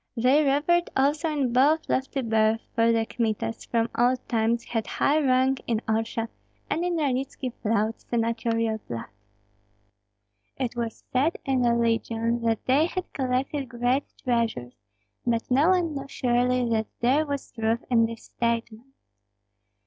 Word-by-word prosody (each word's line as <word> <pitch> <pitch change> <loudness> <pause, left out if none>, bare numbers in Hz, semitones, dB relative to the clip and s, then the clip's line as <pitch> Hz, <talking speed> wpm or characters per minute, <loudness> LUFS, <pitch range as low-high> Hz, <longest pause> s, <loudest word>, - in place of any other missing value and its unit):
They 260 +6 +4
revered 300 +5 +2
also 290 +4 +2
in 280 -6 0
both 295 +6 +3
lofty 270 +1 -1
birth; 220 0 +2
for 230 0 +3
the 225 -1 +1
Kmitas, 225 -1 -2
from 230 -1 +1
old 250 +1 +1
times, 230 0 +1
had 225 -4 -3
high 295 +9 +2
rank 260 -1 +2
in 230 -2 +1
Orsha, 225 +1 -1 0.4
and 335 - 0
in 355 -1 0
Ranitski 265 -4 -2
flowed 220 0 0
senatorial 230 -1 -1
blood. 115 -3 -6 1.5
It 250 -2 -2
was 230 -2 -4
said 280 +6 +2
in 265 -2 +1
the 235 -1 +3
legion 230 0 0
that 225 -1 0
they 285 +5 +3
had 365 0 -5
collected 265 +1 -1
great 245 +3 0 0.2
treasures, 230 - -1 0.5
but 235 0 -1
no 285 +7 +4
one 355 -4 +2
knew 275 -1 -5
surely 250 -1 +1
that 220 -1 +1
there 265 +6 +3
was 280 -1 -4
truth 225 0 -1
in 230 -2 +4
this 230 0 -8
statement. 235 +2 -3
245 Hz, 145 wpm, -26 LUFS, 230-275 Hz, 1.5 s, They